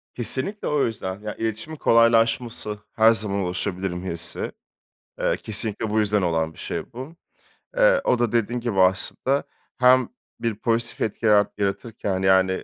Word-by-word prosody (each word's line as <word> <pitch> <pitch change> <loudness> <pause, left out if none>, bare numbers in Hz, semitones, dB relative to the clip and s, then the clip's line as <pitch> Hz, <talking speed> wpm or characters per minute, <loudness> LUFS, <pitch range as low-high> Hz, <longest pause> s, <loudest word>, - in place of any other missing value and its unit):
Kesinlikle, 130 - -4
o 150 -1 +2
yüzden. 95 -4 -4
Ya, 105 0 -5
iletişimin 115 +8 -3
kolaylaşması, 115 -2 +2
"Her 110 0 +5
zaman 105 -3 0
ulaşabilirim." 90 -1 -2
hissi. 85 -3 -3 0.7
Eee, - - +1
kesinlikle, 110 0 -2
bu 110 +1 +1
yüzden 105 -1 +2
olan 80 -2 0
bir - - -21
şey - - -5
bu. 130 +7 -8 0.6
Eee, - - +5
o 125 - +2
da 120 -3 +1
dediğim 120 +1 0
gibi, 115 -5 -1
aslında 95 +9 +2 0.3
hem 125 0 +5 0.3
bir 115 -2 -1
pozitif 115 +2 -1
etki 110 +1 -2
yarat 105 -1 +3
yaratırken, 100 -1 -2
yani, 95 0 +3
110 Hz, 145 wpm, -23 LUFS, 95-120 Hz, 0.7 s, Her